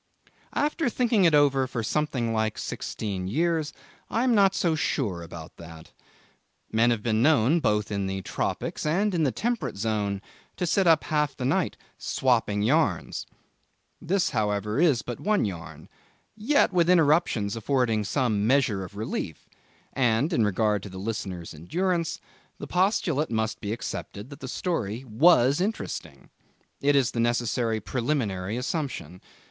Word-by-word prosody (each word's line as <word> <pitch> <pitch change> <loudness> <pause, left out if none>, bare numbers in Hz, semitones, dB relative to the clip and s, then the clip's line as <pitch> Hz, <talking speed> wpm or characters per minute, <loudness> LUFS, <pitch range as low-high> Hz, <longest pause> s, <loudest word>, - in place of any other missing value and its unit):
After 300 -1 +1
thinking 230 -5 +2
it 165 -3 +5
over 140 -3 +3
for 120 -3 -3
something 125 -3 -1
like 110 -1 0
sixteen 95 -4 -4
years, 160 - 0 0.4
I 230 - 0
am 255 -2 +3
not 195 -3 +4
so 170 -3 +1
sure 120 - -1
about 80 -1 -10
that. 80 -1 -12 0.8
Men 115 +2 +3
have 115 -3 0
been 110 -1 +1
known, 145 +2 +4
both 105 -7 0
in 100 -1 -1
the 95 0 -4
tropics - - -3
and 190 +7 +1
in 170 - +1
the 140 -4 +2
temperate 235 - -2
zone, 105 -2 -1 0.4
to 180 - -1
sit 185 +2 +2
up 160 -2 +5
half 150 -2 0
the 125 - -3
night 130 - 0 0.2
'swapping 115 -5 +1
yarns'. 125 - +1 0.7
This, 185 +3 0
however, 105 +2 -1
is 145 -10 +3
but 120 - -6
one 210 - +1
yarn, 90 -5 -7 0.5
yet 220 0 +2
with 175 -1 +3
interruptions 150 - +3
affording 115 -2 +1
some 110 -2 0
measure 125 -7 +2
of 95 - -10
relief; 100 -7 -5 0.5
and 125 +5 +1
in 115 - +3
regard 105 0 +1
to 100 - -8
the 95 - -9
listeners' 95 -5 -5
endurance, 170 - -1 0.4
the - - -7
postulate 180 -5 +1
must 110 0 -2
be 105 -2 -3
accepted 110 +1 -6
that 145 - -10
the 130 - -7
story 125 - -2
was 135 +3 +4
interesting. 215 +4 -4 0.5
It 145 +1 +3
is 135 -4 +3
the 115 - -3
necessary 120 -1 0
preliminary 115 -5 -2
assumption. 125 - -4
120 Hz, 150 wpm, -26 LUFS, 105-160 Hz, 0.8 s, it